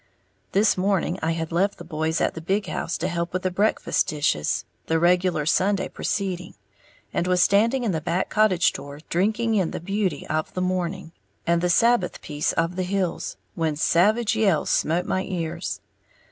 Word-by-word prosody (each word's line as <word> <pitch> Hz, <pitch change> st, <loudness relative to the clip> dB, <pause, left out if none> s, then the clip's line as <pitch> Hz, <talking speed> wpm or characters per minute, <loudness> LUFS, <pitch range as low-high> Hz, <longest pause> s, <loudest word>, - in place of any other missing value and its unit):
This 200 Hz, -1 st, +3 dB
morning 185 Hz, -2 st, 0 dB
I 160 Hz, +1 st, 0 dB
had 165 Hz, 0 st, -4 dB
left 190 Hz, +4 st, +1 dB
the -, -, -9 dB
boys 160 Hz, -1 st, -1 dB
at -, -, +1 dB
the 160 Hz, -, -7 dB
big 195 Hz, +5 st, 0 dB
house 170 Hz, -, -3 dB
to 180 Hz, -, -2 dB
help 170 Hz, -1 st, -2 dB
with 185 Hz, -, -2 dB
the 185 Hz, -, 0 dB
breakfast 205 Hz, +4 st, +1 dB
dishes 145 Hz, -, 0 dB, 0.2 s
the 165 Hz, -, +2 dB
regular 175 Hz, -2 st, +2 dB
Sunday 190 Hz, +4 st, +2 dB
proceeding 185 Hz, -3 st, -3 dB, 0.6 s
and 175 Hz, -, 0 dB
was 180 Hz, 0 st, +4 dB
standing 230 Hz, +6 st, +3 dB
in 225 Hz, -, +1 dB
the 160 Hz, -3 st, -2 dB
back 175 Hz, +3 st, -1 dB
cottage 210 Hz, -5 st, +3 dB
door 145 Hz, +1 st, -8 dB
drinking 220 Hz, +6 st, +1 dB
in 190 Hz, -6 st, +2 dB
the -, -, -5 dB
beauty 190 Hz, -4 st, -2 dB
of 155 Hz, 0 st, -2 dB
the -, -, -1 dB
morning 185 Hz, -1 st, -2 dB, 0.3 s
and 170 Hz, 0 st, +2 dB
the 180 Hz, -, +1 dB
Sabbath 230 Hz, -1 st, +3 dB
peace 150 Hz, -1 st, -1 dB
of 165 Hz, +2 st, -1 dB
the -, -, 0 dB
hills, 185 Hz, -1 st, -2 dB, 0.2 s
when 160 Hz, -2 st, -1 dB
savage 210 Hz, +9 st, +3 dB
yells 200 Hz, -8 st, +2 dB
smote 170 Hz, +3 st, +1 dB
my 185 Hz, -, 0 dB
ears. 170 Hz, -3 st, -4 dB
180 Hz, 180 wpm, -24 LUFS, 165-195 Hz, 0.6 s, was